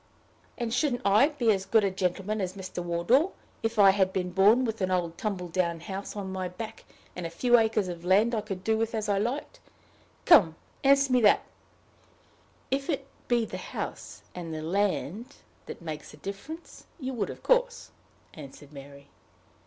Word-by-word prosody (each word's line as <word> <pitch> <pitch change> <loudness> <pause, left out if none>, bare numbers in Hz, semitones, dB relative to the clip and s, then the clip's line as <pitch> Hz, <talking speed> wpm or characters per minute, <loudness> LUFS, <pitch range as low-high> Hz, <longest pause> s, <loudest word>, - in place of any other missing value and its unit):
"And 235 -2 -3
shouldn't 250 -2 0
I 210 +7 +5
be 245 -7 +1
as 195 -2 -1
good 220 0 +4
a 195 - +1
gentleman 195 +3 -2
as 185 -1 -2
Mr. 185 -2 -6
Wardour, 200 - +2 0.3
if 225 0 -2
I 200 -2 +8
had 190 -1 +2
been 180 -1 -2
born 210 +7 +5
with 225 -2 -3
an 185 - +1
old 175 -2 -1
tumble 190 -4 -3
down 170 -1 -1
house 195 +4 -6
on 195 -2 -5
my 185 -1 -3
back, 220 +5 -8 0.3
and 180 - -5
a - - -8
few 240 +8 +3
acres 220 -3 +1
of 175 -1 -6
land 205 +6 +3
I 220 - 0
could 195 -3 -6
do 220 +2 +1
with 225 0 -1
as 215 -1 -2
I 200 -1 +1
liked? 240 +8 -3 0.7
Come, 185 - +7 0.3
answer 275 -1 +4
me 250 - +4
that." 210 - +5 1.3
"If 275 +3 -1
it 275 -4 -1 0.2
be 240 -2 +2
the - - -6
house - - -7
and 170 -2 -6
the 155 0 -5
land 200 - -1 0.3
that - - -8
makes 155 -2 -6
the - - -13
difference, 200 - -9
you 260 -2 -4
would, 230 - -2
of - - -9
course," - - +1 0.4
answered 145 0 -12
Mary. 140 0 -12
200 Hz, 185 wpm, -28 LUFS, 180-235 Hz, 1.3 s, I